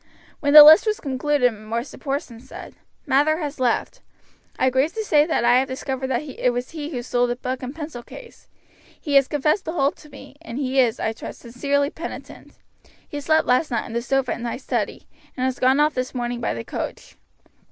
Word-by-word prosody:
When 285 0 +1
the 300 - +14
list 315 +8 +8
was 425 0 0
concluded 275 -2 +1
Mr. 225 +4 -6
Porson 275 -5 -4
said: 255 - -11 0.3
"Mather 295 +2 +2
has 295 -4 -5
left; 245 -2 -1 0.6
I 260 - +2
grieve 265 +5 +1
to 440 - -2
say 300 -4 +3
that 320 - 0
I 245 +1 +5
have 265 - -1
discovered 265 0 -4
that 260 +1 -1
it 270 -3 -1
was 245 +1 -3
he 305 -2 -6
who 250 -6 -5
stole 245 0 +1
the 240 - -2
book 255 +1 -4
and 260 +2 -6
pencil 300 -6 -7
case. 470 - -14 0.5
He 290 - -4
has 275 -1 +5
confessed 300 +6 0
the 320 - -4
whole 280 -4 +2
to 305 - -18
me, 280 - -14
and 260 -7 -8
he 270 -1 0
is, 240 -4 +2
I 220 - -1
trust, - - -9
sincerely 280 +4 -1
penitent. 335 - -9 0.5
He 290 - -6
slept 315 +2 +2
last 250 +5 +2
night 235 -4 -2
on 225 - -9
the 235 - -1
sofa 265 +1 0
in - - -4
my 235 0 -3
study, - - -4 0.3
and 255 - 0
has 260 -1 -2
gone 260 +2 +3
off 300 +1 +3
this 255 +1 -4
morning 240 -1 -3
by 230 - -1
the 115 - -5
coach. - - -6
265 Hz, 215 wpm, -22 LUFS, 245-295 Hz, 0.6 s, the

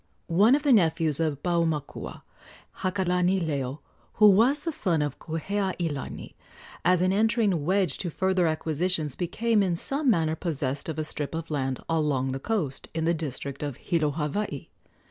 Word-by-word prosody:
One 205 +9 +5
of 295 - -1
the 285 -3 +5
nephews 160 - +2
of 155 -4 -1
Paumakua, 165 -4 -2 0.6
Hakalanileo, 180 -7 0 0.3
who 210 -1 +7
was 245 +9 +4
the 330 - -2
son 170 - 0
of 145 -2 -4
Kuheailani, 170 -2 -3 0.5
as 180 0 +3
an 185 +1 +2
entering 210 -5 +2
wedge 185 -4 +1
to 175 - -2
further 185 +1 +1
acquisitions 155 -1 -1
became 215 +5 +1
in 185 -3 +1
some 275 - 0
manner 160 -7 +2
possessed 145 -4 -2
of 160 - -4
a 155 - -1
strip 150 0 -4
of 165 -1 -5
land 135 -3 -1
along 150 -5 +1
the 135 +1 -3
coast 160 -7 -2
in 160 -1 0
the 170 - +3
district 140 -3 -5
of 145 -4 -4
Hilo, 165 -4 0
Hawaii. 150 +2 -3
165 Hz, 155 wpm, -27 LUFS, 150-190 Hz, 0.6 s, who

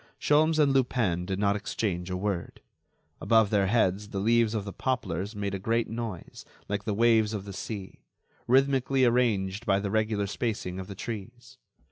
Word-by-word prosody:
Sholmes 155 +2 +3
and 145 -3 +4
Lupin 115 -10 +1
did 95 -1 -2
not 100 0 +2
exchange 95 -3 -3
a 90 - -2
word. 95 -3 -3 0.6
Above 110 -3 +3
their 100 -2 +3
heads 105 -2 +1
the 100 - -5
leaves 115 +2 +2
of 105 -2 -2
the 100 - -6
poplars 105 -5 -2
made 100 -1 -3
a 100 - -3
great 115 +4 0
noise 115 -5 -6 0.2
like 100 0 -3
the 105 - -1
waves 110 -1 +3
of 100 -1 -5
the 100 - -7
sea, 100 0 -7 0.5
rhythmically 135 0 +3
arranged 110 -4 +1
by 95 - +2
the 100 -1 -3
regular 110 -1 0
spacing 100 -3 -3
of 95 - -6
the 100 - -8
trees. 120 +4 -8
105 Hz, 175 wpm, -28 LUFS, 100-120 Hz, 0.6 s, and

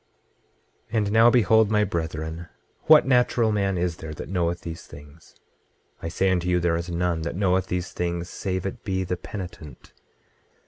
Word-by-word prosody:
26:21 115 - -2
And 105 -2 +1
now 115 +2 +6
behold, 110 -2 +4
my 105 -1 +3
brethren, 80 -2 -4 0.4
what 155 -1 +7
natural 125 -3 +3
man 100 -3 0
is 85 -1 -1
there 80 -1 -7
that - - -8
knoweth 85 -2 -1
these 85 -1 -8
things? 75 +2 -15 0.7
I - - -4
say 95 +3 +1
unto 90 -1 0
you, 90 0 +3
there 85 -1 +1
is 85 +1 -4
none 85 -1 -1
that 85 +1 -4
knoweth 95 -1 +1
these 90 0 -3
things, 85 0 -3
save 95 -1 -4
it 105 +5 -5
be 95 -3 -1
the 90 0 -2
penitent. 90 -6 -9
90 Hz, 175 wpm, -25 LUFS, 85-105 Hz, 0.7 s, what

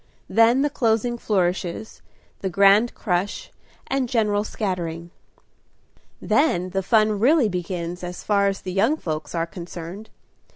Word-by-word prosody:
Then 230 +4 +4
the 295 - 0
closing 235 -1 0
flourishes, 185 0 -2 0.4
the 190 - -2
grand 200 +5 +4
crush, 185 -1 -2 0.3
and 265 -2 -1
general 210 -3 +1
scattering. 170 -6 -4 1.1
Then 185 - +1
the 195 +1 0
fun 215 +1 +2
really 265 +2 +4
begins, 180 -1 -4
as 180 0 -6
far 200 -1 +2
as 195 0 -2
the 185 - -5
young 225 +11 +2
folks 155 - -5
are 165 0 0
concerned. 175 +4 -9
200 Hz, 130 wpm, -23 LUFS, 175-225 Hz, 1.1 s, Then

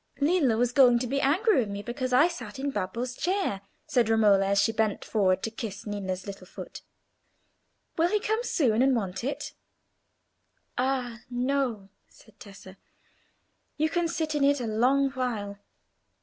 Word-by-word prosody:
"Lillo 285 -6 +2
was 245 +1 +1
going 250 -2 +6
to 245 - -2
be 275 +3 -1
angry 355 - +3
with 220 -5 -1
me, 200 0 -5
because 255 +2 -4
I 255 +6 +5
sat 250 -12 -7
in 280 +1 -2
Babbo's 245 +4 -3
chair," 360 - -1 0.2
said 245 -8 +1
Romola, 205 -3 +4
as 200 0 +2
she 200 +3 +3
bent 220 -2 -1
forward 190 -3 +1
to 225 - -2
kiss 215 -3 -6
Ninna's 190 -3 -4
little 195 -2 -9
foot. - - -9 1.2
"Will 335 +2 +4
he 425 - +1
come 435 +2 -1
soon 250 - +1
and 265 0 +4
want 195 -2 -3
it?" 275 +3 -4 1.2
"Ah, 250 -2 -1
no!" 245 -5 -1 0.2
said 220 -1 -21
Tessa, 195 -2 -13 1.0
"you 310 +1 +1
can 345 0 +1
sit 315 -2 -2
in 295 -2 +1
it 285 0 +3
a 245 - -3
long 255 +5 +2
while. 220 -6 -3
245 Hz, 165 wpm, -27 LUFS, 210-280 Hz, 1.2 s, going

